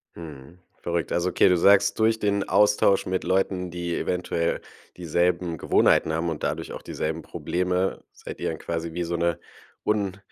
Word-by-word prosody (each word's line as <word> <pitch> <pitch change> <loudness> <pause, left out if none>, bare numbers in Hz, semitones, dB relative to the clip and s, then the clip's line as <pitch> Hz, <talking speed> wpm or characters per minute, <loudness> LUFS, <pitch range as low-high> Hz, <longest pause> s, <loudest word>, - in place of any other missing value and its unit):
Mhm. 80 +1 -11 0.2
Verrückt. 85 -1 -2
Also, 85 +1 +1
okay, - - +4
du 90 -1 +4
sagst: 100 +3 +4
„Durch 110 0 +3
den 100 -1 0
Austausch 105 -1 +3
mit 95 0 -2
Leuten, 95 -1 0
die 85 0 -3
eventuell 85 -2 -1 0.4
dieselben 85 0 0
Gewohnheiten 80 - +3
haben 80 +2 -1
und 80 -2 -5
dadurch - - -3
auch - - -7
dieselben 80 +1 -4
Probleme, 90 +1 -2
seid - - -10
ihr - - -1
dann 80 - -5
quasi 85 0 -4
wie 90 +1 -2
so 85 0 -3
'ne 85 0 0 0.5
un 100 -3 0
90 Hz, 170 wpm, -25 LUFS, 85-95 Hz, 0.5 s, okay